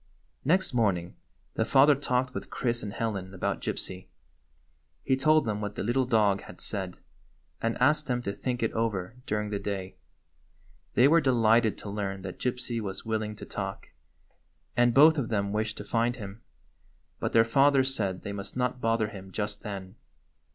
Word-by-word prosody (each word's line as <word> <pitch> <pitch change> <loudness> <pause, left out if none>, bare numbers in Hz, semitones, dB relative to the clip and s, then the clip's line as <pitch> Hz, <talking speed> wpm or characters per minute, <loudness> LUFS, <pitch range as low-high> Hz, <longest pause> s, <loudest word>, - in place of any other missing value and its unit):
Next 185 +2 +2
morning 95 -7 +1 0.4
the - - +1
father 135 +5 +6
talked 130 -2 -1
with - - -6
Chris 120 -1 -1
and 105 - -5
Helen 100 -4 -3
about - - -2
Gypsy. 95 0 -4 1.0
He 130 - +2
told 155 +4 +4
them 105 -1 -2
what 105 0 -4
the - - -3
little 120 +4 +1
dog 105 -4 +3
had 90 - -12
said, 95 -4 -4 0.6
and 115 0 0
asked 145 +3 +3
them 125 -1 -1
to 100 - -2
think 125 +1 -3
it 115 - +1
over 110 -2 -1
during 105 0 -1
the 100 - -1
day. 95 -2 -4 1.0
They 125 - +6
were 165 +3 +5
delighted 115 -4 +3
to 105 - -8
learn 100 -2 -3
that 95 -2 -7
Gypsy 125 -2 -2
was 100 0 -5
willing 110 -1 -2
to - - -9
talk, - - -5 0.9
and 120 0 +4
both 155 +3 +7
of 120 - -2
them 100 -3 0
wished 110 +1 -1
to - - -6
find 115 +3 0
him. 105 -1 -9 0.8
But - - -1
their 115 0 +6
father 135 +3 +4
said 100 -9 -1
they 100 - -4
must 100 +4 -6
not 125 0 -1
bother 115 -1 +1
him 95 -2 -10
just 105 +1 -3
then. 100 -1 -7
115 Hz, 175 wpm, -28 LUFS, 100-125 Hz, 1.0 s, both